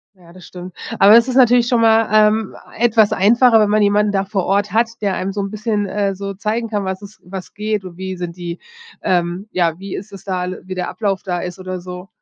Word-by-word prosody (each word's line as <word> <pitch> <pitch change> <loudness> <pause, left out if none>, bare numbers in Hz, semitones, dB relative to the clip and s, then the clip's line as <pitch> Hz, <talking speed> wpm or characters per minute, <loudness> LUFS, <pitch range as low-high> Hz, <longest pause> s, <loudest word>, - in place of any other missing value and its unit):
Ja, 175 -2 -18
das 185 -1 -14
stimmt. 180 0 -10 0.3
Aber 205 +3 +8
es 235 +1 +5
ist 255 - -2
natürlich 245 -2 +5
schon 240 -2 +2
mal, 225 0 +4
ähm, 215 0 +3 0.2
etwas 225 -2 +3
einfacher, 230 +3 +5
wenn 210 -1 +3
man 210 +1 +3
jemanden 205 0 +2
da 195 -1 0
vor 195 -2 -2
Ort 200 +1 0
hat, 230 +1 +2
der 200 -2 0
einem 190 +1 -3
so 200 +1 -3
'n 195 0 -4
bisschen, 215 -1 -1
äh, 200 0 -1
so 200 +1 -5
zeigen 220 +4 -2
kann, 205 -2 -2
was 190 0 -4
es 210 +2 -13
was 185 0 -8
geht 210 -1 -2
und 175 -2 -10
wie 190 0 -5
sind 175 -1 -5
die, 175 -1 -6 0.5
ähm 175 +2 -1
ja, 170 -3 0
wie 195 +1 -7
ist 205 +2 -8
es 195 -2 -11
da 185 -2 -3 0.2
wie 185 0 -7
der 180 -1 -3
Ablauf 200 -3 -2
da 180 -2 -3
ist 180 +2 -6
oder 185 0 -5
so. 180 +1 -9
200 Hz, 240 wpm, -18 LUFS, 185-215 Hz, 0.5 s, Aber